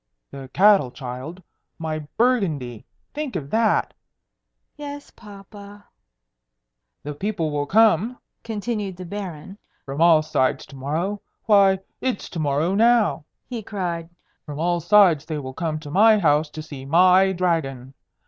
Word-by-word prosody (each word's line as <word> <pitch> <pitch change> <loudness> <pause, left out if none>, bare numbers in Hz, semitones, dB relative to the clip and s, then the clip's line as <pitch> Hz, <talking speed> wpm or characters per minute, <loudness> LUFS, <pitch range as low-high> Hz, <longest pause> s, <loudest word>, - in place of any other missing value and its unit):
"The 135 -1 -9
cattle, 195 -8 +4
child! 130 +8 -8 0.3
my 160 -1 -4 0.2
Burgundy! 165 - 0 0.3
Think 295 -3 -5
of 140 -1 -5
that!" 220 0 +1 0.8
"Yes, 290 -1 -8
papa." 205 -1 -13 1.2
"The 150 - -5
people 165 -1 -3
will 145 -1 -2
come," 220 +3 +3 0.3
continued 210 -4 -4
the 185 - -8
Baron, 190 -1 -7 0.3
"from 140 +3 -5
all 165 -2 +6
sides 135 -4 0
to - - -14
morrow 160 +10 -3 0.2
why, 200 -3 +5 0.2
it's 255 -5 -3
to 170 - -5
morrow 150 +4 0
now!" 225 -6 +3 0.2
he 240 -3 -6
cried. 175 -5 -4 0.3
"From 150 -1 -8
all 175 +1 +1
sides 175 -4 +4
they 155 - -4
will 130 -2 -6
come 160 0 -3
to 145 -2 -9
my 215 +5 +5
house 150 -4 +2
to 155 +1 -8
see 145 -3 -9
my 185 +6 +4
Dragon. 155 -8 -2
175 Hz, 140 wpm, -22 LUFS, 150-205 Hz, 1.2 s, all